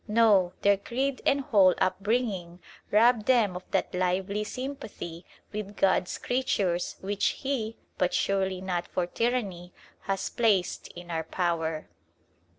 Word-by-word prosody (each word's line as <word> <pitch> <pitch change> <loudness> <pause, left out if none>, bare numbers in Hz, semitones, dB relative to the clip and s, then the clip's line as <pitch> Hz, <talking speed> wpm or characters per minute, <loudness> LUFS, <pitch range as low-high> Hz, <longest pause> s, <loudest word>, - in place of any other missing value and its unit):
No, 210 -5 +4
their 200 0 +5
creed 260 +6 -2
and 280 0 +3
whole 205 -10 +5
upbringing 190 -2 -1 0.3
rob 225 +1 +4
them 225 -8 +3
of 180 - -4
that - - 0
lively 185 +3 0
sympathy 215 -9 -6 0.3
with 210 -1 -5
God's 190 -2 +2
creatures 195 -9 0
which 200 +1 0 0.2
He, 235 -5 -2 0.2
but 180 - +2
surely 190 -1 0
not 180 -2 -2
for 180 - -1
tyranny, 195 -5 -2 0.3
has 195 -1 -1
placed 205 -6 +1
in 175 0 -9
our 160 -1 -1
power. 165 -3 -1
195 Hz, 130 wpm, -28 LUFS, 180-230 Hz, 0.3 s, their